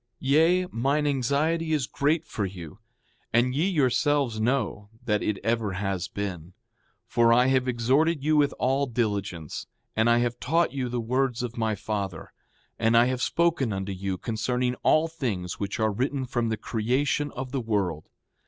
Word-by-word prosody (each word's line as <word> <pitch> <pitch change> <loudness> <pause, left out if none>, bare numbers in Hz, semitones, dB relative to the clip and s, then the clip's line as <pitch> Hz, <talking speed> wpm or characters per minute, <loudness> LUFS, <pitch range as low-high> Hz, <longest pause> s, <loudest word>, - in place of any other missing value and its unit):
Yea, 165 +7 +3
mine 140 +6 +1
anxiety 145 +4 +1
is 145 -5 +1
great 150 +5 0
for 105 - -4
you; 90 -2 -7 0.5
and 120 +2 +2
ye 155 +7 +1
yourselves 140 - +1
know 110 -3 -1 0.2
that 105 -3 +1
it 105 - -1
ever 115 -3 0
has 95 -1 -2
been. 95 -4 -5 0.5
For 115 -1 +3
I 125 +2 +5
have 130 -1 +2
exhorted 135 +6 +2
you 155 +1 +2
with 145 -1 +4
all 135 +2 +1
diligence; 100 - -3 0.3
and 110 +2 +3
I 120 - +5
have 120 0 0
taught 165 +4 +1
you 130 -3 -2
the 120 0 -2
words 125 +1 0
of 120 -1 -4
my 110 -2 0
father; 100 -4 -4 0.5
and 115 +1 +3
I 120 - +6
have 130 0 -1
spoken 165 -8 +1
unto 95 0 -3
you 95 0 -3
concerning 125 +4 -1
all 155 +1 +4
things 115 - -4
which 100 +1 -3
are 110 0 +2
written, 130 +5 -1
from 120 -2 -1
the 110 - -1
creation 135 +7 0
of 130 0 -5
the 135 -1 -1
world. 100 -9 -2
120 Hz, 170 wpm, -26 LUFS, 105-140 Hz, 0.5 s, I